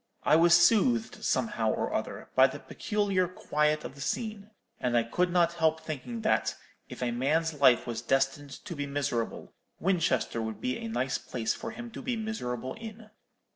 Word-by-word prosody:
I -, -, +5 dB
was 170 Hz, +1 st, +6 dB
soothed, 225 Hz, +6 st, +3 dB
somehow -, -, +1 dB
or -, -, -2 dB
other, -, -, -4 dB
by -, -, +7 dB
the -, -, -7 dB
peculiar 200 Hz, -4 st, -1 dB
quiet 150 Hz, -3 st, 0 dB
of -, -, -7 dB
the 140 Hz, -, -12 dB
scene; 215 Hz, -, -3 dB, 0.3 s
and 120 Hz, -1 st, +1 dB
I 115 Hz, -, +4 dB
could 175 Hz, +10 st, 0 dB
not 175 Hz, -1 st, +3 dB
help 160 Hz, -1 st, +2 dB
thinking 125 Hz, -7 st, -6 dB
that, -, -, +1 dB, 0.3 s
if -, -, -6 dB
a 120 Hz, -, 0 dB
man's 155 Hz, +7 st, +1 dB
life 135 Hz, -5 st, +4 dB
was 115 Hz, -1 st, -4 dB
destined 135 Hz, +3 st, -1 dB
to 170 Hz, -, -5 dB
be 145 Hz, -1 st, -3 dB
miserable, 135 Hz, -5 st, -2 dB, 0.3 s
Winchester 170 Hz, -9 st, +1 dB
would 110 Hz, -1 st, -4 dB
be 255 Hz, -2 st, -2 dB
a 230 Hz, -, -5 dB
nice 135 Hz, -, -1 dB
place 115 Hz, -2 st, -2 dB
for 230 Hz, -, -6 dB
him 235 Hz, +1 st, -8 dB
to -, -, -8 dB
be 250 Hz, -, -2 dB
miserable 130 Hz, -, -4 dB
in. 220 Hz, -1 st, -10 dB
160 Hz, 180 wpm, -29 LUFS, 130-210 Hz, 0.3 s, by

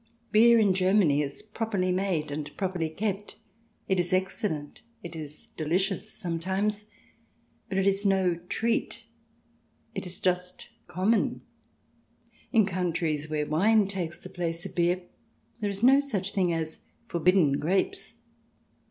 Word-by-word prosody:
Beer 235 Hz, +2 st, +7 dB
in 205 Hz, -4 st, +4 dB
Germany 185 Hz, -6 st, +3 dB
is 140 Hz, -1 st, -4 dB
properly 210 Hz, -4 st, -1 dB
made 180 Hz, -5 st, 0 dB
and 145 Hz, 0 st, -5 dB
properly 180 Hz, -4 st, -1 dB
kept; 200 Hz, +4 st, -3 dB, 0.5 s
it 190 Hz, -1 st, +2 dB
is 175 Hz, +1 st, +1 dB
excellent, 185 Hz, -5 st, -1 dB, 0.2 s
it 170 Hz, -1 st, -7 dB
is 150 Hz, -1 st, -9 dB
delicious 190 Hz, +6 st, -1 dB
sometimes. 195 Hz, +4 st, -2 dB, 0.8 s
But 190 Hz, -, -2 dB
it 195 Hz, -, +2 dB
is 195 Hz, 0 st, +2 dB
no 190 Hz, -3 st, +3 dB, 0.2 s
treat; 230 Hz, +1 st, -1 dB, 0.9 s
it -, -, -4 dB
is 180 Hz, -, -6 dB
just 180 Hz, 0 st, -1 dB, 0.2 s
common. 185 Hz, +6 st, +1 dB, 1.1 s
In 225 Hz, -4 st, +5 dB
countries 165 Hz, -5 st, -1 dB
where 150 Hz, -1 st, 0 dB
wine 200 Hz, +7 st, +3 dB
takes 180 Hz, -4 st, -4 dB
the -, -, -10 dB
place 170 Hz, -2 st, -3 dB
of -, -, -7 dB
beer 175 Hz, +1 st, +1 dB, 0.6 s
there 210 Hz, -3 st, -1 dB
is 200 Hz, +2 st, -5 dB
no 270 Hz, +3 st, +7 dB
such 205 Hz, -9 st, -2 dB
thing 185 Hz, -4 st, +2 dB
as 160 Hz, -1 st, -3 dB, 0.3 s
forbidden 170 Hz, -4 st, +3 dB
grapes. 195 Hz, -, -1 dB
185 Hz, 135 wpm, -28 LUFS, 165-200 Hz, 1.1 s, Beer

